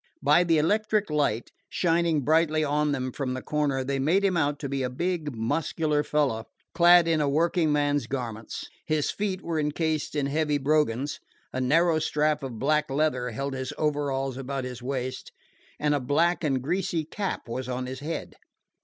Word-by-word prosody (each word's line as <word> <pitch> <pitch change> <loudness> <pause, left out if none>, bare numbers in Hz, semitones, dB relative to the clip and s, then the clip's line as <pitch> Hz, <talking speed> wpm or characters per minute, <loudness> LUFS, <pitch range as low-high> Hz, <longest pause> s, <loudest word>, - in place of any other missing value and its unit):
By 150 +5 +5
the 165 -2 +3
electric 210 +4 +1
light, 140 -7 0 0.2
shining 170 -3 +1
brightly 155 +2 +2
on 150 0 +1
them 130 -2 -2
from 130 -1 -3
the 130 - -4
corner, 145 -3 0
they 135 +1 -2
made 175 +9 +2
him 190 -2 +2
out 145 -3 +1
to 140 - -2
be 135 0 -2
a 125 - -1
big, 155 0 -2
muscular 150 +6 0
fellow, 145 -7 0 0.3
clad 175 0 +6
in 160 -2 +2
a 145 - +1
working 165 +2 +2
man's 145 -3 +1
garments. 115 -4 -5 0.2
His 155 -2 +1
feet 195 -2 -3
were 165 -2 -1
incased 155 +1 -1
in 145 -2 +1
heavy 150 +1 +1
brogans, 145 -2 0 0.3
a 130 - -1
narrow 160 +5 +3
strap 150 0 +1
of 130 -4 -6
black 150 +5 +1
leather 135 -3 0
held 135 +4 -3
his 130 -1 -4
overalls 140 -3 -1
about 135 0 -4
his 125 -1 -6
waist, 130 0 -4 0.5
and 150 0 +2
a 145 - +1
black 165 +7 +1
and 135 -4 0
greasy 175 +1 -1
cap 195 0 -4
was 130 +2 -4
on 125 0 -2
his 130 +1 -6
head. 155 +4 -5
150 Hz, 180 wpm, -27 LUFS, 135-160 Hz, 0.5 s, clad